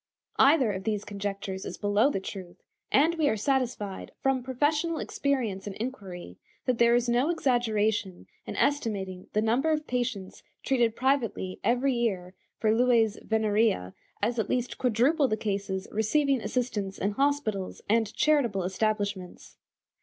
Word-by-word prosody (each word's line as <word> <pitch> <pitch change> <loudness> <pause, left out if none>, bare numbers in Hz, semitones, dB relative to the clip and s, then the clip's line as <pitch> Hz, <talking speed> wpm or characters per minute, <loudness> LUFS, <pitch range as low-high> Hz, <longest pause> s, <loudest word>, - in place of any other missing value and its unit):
Either 275 -5 +5
of 190 -1 -5
these 210 -1 -2
conjectures 200 -1 -4
is - - -6
below 205 +5 +3
the 195 - -1
truth, 185 -2 -9 0.3
and 310 +5 +4
we 300 - +3
are 220 - 0
satisfied, 235 -5 -2
from 270 -1 +1
professional 295 +6 0
experience 235 -13 -2
and 195 - -5
inquiry, 195 - -7 0.3
that 250 -2 0
there 235 0 +5
is 245 0 +1
no 245 +5 +2
exaggeration 220 - 0 0.2
in - - -5
estimating 200 -10 -1
the 215 - +2
number 245 +8 +2
of 305 -1 0
patients 245 -7 -3 0.2
treated 240 -4 +2
privately 245 -8 0
every 250 +3 +2
year 195 -7 -1 0.2
for 215 0 +2
lues 230 -3 +3
venerea 215 - +1 0.3
as 230 +2 +1
at 210 - -1
least 250 0 -2
quadruple 260 +5 +3
the 215 - -1
cases 195 -2 -3
receiving 265 +5 +1
assistance 210 -3 -2
in 200 - 0
hospitals 220 -6 -1
and 220 0 +2
charitable 245 -11 +2
establishments. 200 -1 -2
225 Hz, 145 wpm, -28 LUFS, 200-260 Hz, 0.3 s, Either